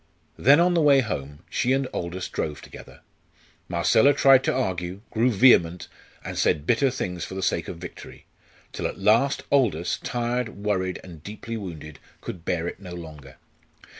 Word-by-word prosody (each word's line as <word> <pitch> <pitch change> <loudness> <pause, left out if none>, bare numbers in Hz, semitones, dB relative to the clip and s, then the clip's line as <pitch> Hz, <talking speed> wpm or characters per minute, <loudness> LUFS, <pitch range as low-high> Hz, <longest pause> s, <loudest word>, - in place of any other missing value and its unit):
Then 140 +5 +6
on 175 +1 +3
the 170 - +2
way 140 -3 +5
home, 75 - -5
she 125 +2 0
and 135 0 +1
Aldous 90 +1 -4
drove 75 -2 -4
together. - - -13 0.7
Marcella 110 +10 +4
tried 135 -2 +6
to - - +2
argue, 95 -6 -3
grew 115 +3 +2
vehement, 95 -7 +4 0.4
and - - -4
said 75 -1 +1
bitter 120 +7 +3
things 90 -8 -4
for 95 - -7
the 95 - -4
sake 85 -2 0
of 85 - -6
victory, 90 0 -11 0.5
till - - -2
at - - -7
last 110 +8 +2
Aldous, 105 - +1
tired, 120 0 -2 0.2
worried, 95 -3 -1
and 85 -4 -12
deeply 110 +4 -7
wounded, 80 -8 -8 0.2
could 85 -3 -8
bear 85 -1 -1
it - - -6
no 90 -3 -9
longer. 75 -6 -11
95 Hz, 165 wpm, -25 LUFS, 85-125 Hz, 0.7 s, Then